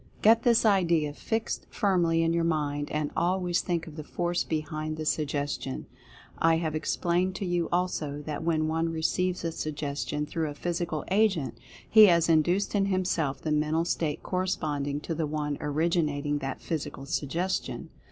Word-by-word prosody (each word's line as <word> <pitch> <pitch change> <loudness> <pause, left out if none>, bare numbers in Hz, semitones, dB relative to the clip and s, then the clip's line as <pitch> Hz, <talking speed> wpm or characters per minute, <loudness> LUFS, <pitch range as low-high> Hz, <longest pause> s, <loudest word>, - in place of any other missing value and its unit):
Get 225 +2 +6
this 235 -2 +4
idea 170 -7 +3
fixed 225 +8 -3
firmly 170 -5 +2
in 165 0 +2
your 170 0 +1
mind, 145 -3 -1
and 150 -1 -2
always 180 0 +1
think 170 -2 -2
of 160 -1 -11
the 155 - -5
Force 175 +3 -1
behind 155 0 -3
the 155 - -4
Suggestion. 145 -3 -2 0.5
I 165 0 +4
have 160 -2 -2
explained 175 +4 0
to 195 - -3
you, 175 -2 0
also, 155 -5 -1
that 150 -2 -4
when 160 -2 +1
one 165 +1 0
receives 180 +3 0
a 165 - 0
Suggestion 150 -1 -3
through 160 0 -2
a 145 - -7
Physical 170 -1 -2
agent, 190 - +2 0.3
he 215 -1 +8
has 170 -2 +4
induced 175 +5 +2
in 200 -1 +2
himself 180 -7 0
the 155 - -1
mental 155 +2 +1
state 160 -3 -1
corresponding 150 -6 -1
to 165 - -3
the 160 -1 -1
one 150 -1 -2
originating 150 -1 0
that 135 -1 -4
Physical 145 -4 -4
Suggestion. 165 +7 -2
165 Hz, 160 wpm, -28 LUFS, 150-175 Hz, 0.5 s, he